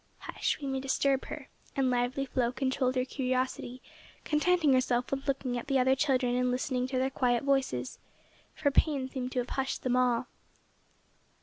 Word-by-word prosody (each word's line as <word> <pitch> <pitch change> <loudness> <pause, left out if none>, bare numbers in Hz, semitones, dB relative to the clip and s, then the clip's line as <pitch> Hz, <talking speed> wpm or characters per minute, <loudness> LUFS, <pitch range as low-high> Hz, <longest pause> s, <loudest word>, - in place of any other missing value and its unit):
"Hush, - - -2
we 285 - -6
may 270 -1 -1
disturb 270 0 +1
her," 295 -3 -7 0.3
and 265 -2 +2
lively 245 +2 0
Flo 245 -2 0
controlled 260 0 0
her 255 0 +1
curiosity, 255 -1 -2 0.4
contenting 310 -1 +3
herself 250 -1 +1
with 275 +1 -3
looking 265 -3 -1
at - - -9
the 275 -1 +2
other 260 +1 +4
children 260 -3 +1
and 250 0 +1
listening 250 0 -1
to 260 0 -2
their 260 +1 +1
quiet 245 -2 +1
voices, 265 - 0 0.6
for 285 -2 +1
pain 275 -2 +2
seemed 260 -1 -4
to - - -5
have 245 0 -1
hushed 270 0 -2
them 250 -1 +1
all. 250 -1 +2
260 Hz, 175 wpm, -30 LUFS, 250-270 Hz, 0.6 s, other